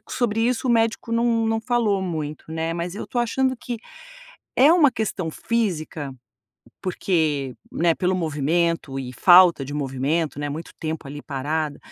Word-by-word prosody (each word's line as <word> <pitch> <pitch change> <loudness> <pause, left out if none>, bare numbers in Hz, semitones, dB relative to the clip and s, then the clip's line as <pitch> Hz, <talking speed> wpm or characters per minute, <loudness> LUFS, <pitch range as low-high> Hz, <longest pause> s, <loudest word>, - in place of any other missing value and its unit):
sobre 225 -3 0
isso 250 +2 +1
o - - +4
médico 230 0 +1
não 230 -1 +2
não 225 0 0
falou 225 -4 +1
muito, 155 -5 -4
né, 165 +1 -2
mas 170 +2 -4
eu - - -5
estou 240 - -2
achando 260 +2 +1
que 240 0 -5 0.8
é 275 +5 +6
um 345 -4 +4
questão 195 -8 -3
física. 160 - -2 0.7
Porque, 155 -8 0 0.2
né, 165 0 +2
pelo 185 +1 0
movimento 160 -2 0
e 125 -1 -5
falta 175 +1 +6
de 140 - -7
movimento, 145 +3 -1
né, 145 0 -2
muito 155 +4 -6
tempo 160 -2 -4
ali 145 +1 -8
parada, 145 +2 -2
170 Hz, 155 wpm, -23 LUFS, 150-225 Hz, 0.8 s, é